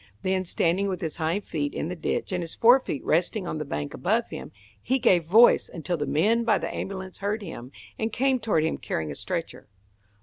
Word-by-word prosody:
Then, 185 Hz, 0 st, 0 dB
standing 175 Hz, +3 st, +1 dB
with 185 Hz, -3 st, -2 dB
his 160 Hz, -3 st, -3 dB
hind 165 Hz, +5 st, -1 dB
feet 145 Hz, -3 st, -3 dB
in -, -, -2 dB
the 180 Hz, -, -4 dB
ditch 165 Hz, -, -2 dB
and 180 Hz, -1 st, -1 dB
his 165 Hz, -1 st, -5 dB
fore 245 Hz, +3 st, +6 dB
feet 150 Hz, -, -5 dB
resting 180 Hz, +5 st, +1 dB
on 155 Hz, -, -3 dB
the -, -, -2 dB
bank 75 Hz, -, -4 dB
above -, -, 0 dB
him, -, -, -7 dB, 0.3 s
he 260 Hz, -, +1 dB
gave 185 Hz, -10 st, +3 dB
voice 220 Hz, +8 st, +6 dB
until 175 Hz, +1 st, -3 dB
the 145 Hz, -3 st, -3 dB
men 220 Hz, +9 st, +2 dB
by 220 Hz, -3 st, +3 dB
the -, -, -4 dB
ambulance 190 Hz, -1 st, -6 dB
heard 205 Hz, +2 st, -2 dB
him, 130 Hz, -8 st, -8 dB, 0.3 s
and 220 Hz, 0 st, -1 dB
came 260 Hz, +3 st, +1 dB
toward 210 Hz, -9 st, +1 dB
him 160 Hz, -, -1 dB
carrying 80 Hz, -2 st, -3 dB
a -, -, -6 dB
stretcher. -, -, -5 dB
185 Hz, 215 wpm, -26 LUFS, 160-215 Hz, 0.3 s, fore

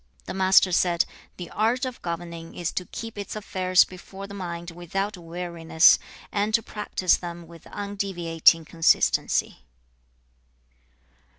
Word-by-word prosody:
The -, -, -5 dB
Master 190 Hz, 0 st, +5 dB
said, 175 Hz, -1 st, +2 dB, 0.3 s
'The 175 Hz, -2 st, -8 dB
art 230 Hz, +5 st, +1 dB
of 255 Hz, -2 st, -6 dB
governing 170 Hz, -1 st, -6 dB
is 175 Hz, -2 st, -2 dB
to 180 Hz, -, -4 dB
keep 225 Hz, -2 st, -7 dB
its 200 Hz, -, -5 dB
affairs 185 Hz, -3 st, +3 dB
before 190 Hz, +2 st, -10 dB
the 200 Hz, -, -10 dB
mind 175 Hz, -3 st, -6 dB
without 195 Hz, +4 st, -3 dB
weariness, 170 Hz, -1 st, +3 dB, 0.3 s
and 210 Hz, +1 st, +1 dB
to 230 Hz, -, +1 dB
practise 205 Hz, -4 st, 0 dB
them 170 Hz, -1 st, -8 dB
with 165 Hz, -1 st, -15 dB
undeviating 175 Hz, -5 st, +1 dB
consistency.' 165 Hz, +1 st, +2 dB
180 Hz, 125 wpm, -25 LUFS, 170-200 Hz, 0.3 s, Master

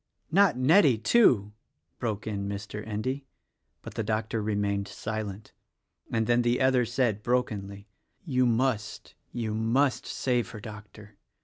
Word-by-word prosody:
"Not 185 Hz, -6 st, +4 dB
Nettie, 140 Hz, -, +5 dB
too!" 110 Hz, -, +4 dB, 0.5 s
broke 110 Hz, -3 st, -3 dB
in 100 Hz, -2 st, -3 dB
Mr. 100 Hz, +1 st, -5 dB
Endy; 130 Hz, +6 st, -3 dB, 0.6 s
but -, -, -8 dB
the -, -, -2 dB
doctor 110 Hz, +1 st, -1 dB
remained 100 Hz, -1 st, -1 dB
silent, 110 Hz, -1 st, -6 dB, 0.6 s
and 110 Hz, -1 st, +1 dB
then 120 Hz, +1 st, +3 dB
the 120 Hz, +1 st, +1 dB
other 130 Hz, -2 st, +3 dB
said 115 Hz, -3 st, 0 dB
brokenly, 105 Hz, -5 st, -2 dB, 0.4 s
"You 130 Hz, -5 st, +2 dB
must, 120 Hz, -1 st, -1 dB, 0.2 s
you 115 Hz, -3 st, -3 dB
must, 120 Hz, +5 st, +1 dB
save 125 Hz, -4 st, -1 dB
her, 110 Hz, -, -8 dB
Doctor. 105 Hz, -1 st, -11 dB
110 Hz, 130 wpm, -28 LUFS, 105-125 Hz, 0.6 s, Nettie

